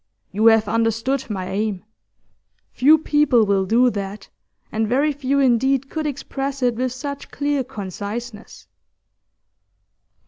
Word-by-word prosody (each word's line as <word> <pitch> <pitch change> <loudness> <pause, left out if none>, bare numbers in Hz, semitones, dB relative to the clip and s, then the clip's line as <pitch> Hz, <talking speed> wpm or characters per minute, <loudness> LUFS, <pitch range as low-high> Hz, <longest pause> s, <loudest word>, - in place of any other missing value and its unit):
You 215 +3 +2
have 225 -1 +5
understood 230 +4 0
my 185 -3 -4
aim. 205 -2 -2 0.9
Few 300 +5 +5
people 295 -7 +3
will 195 -2 +1
do 245 +4 +4
that, 200 -1 -6 0.4
and 220 0 -1
very 275 +6 +2
few 280 -1 -1
indeed 265 +1 +2
could 315 -1 -2
express 275 -1 -4
it 245 -1 +3
with 250 +2 -2
such 280 +2 -6
clear 285 -2 -1
conciseness. 210 - -7
240 Hz, 125 wpm, -21 LUFS, 215-275 Hz, 0.9 s, have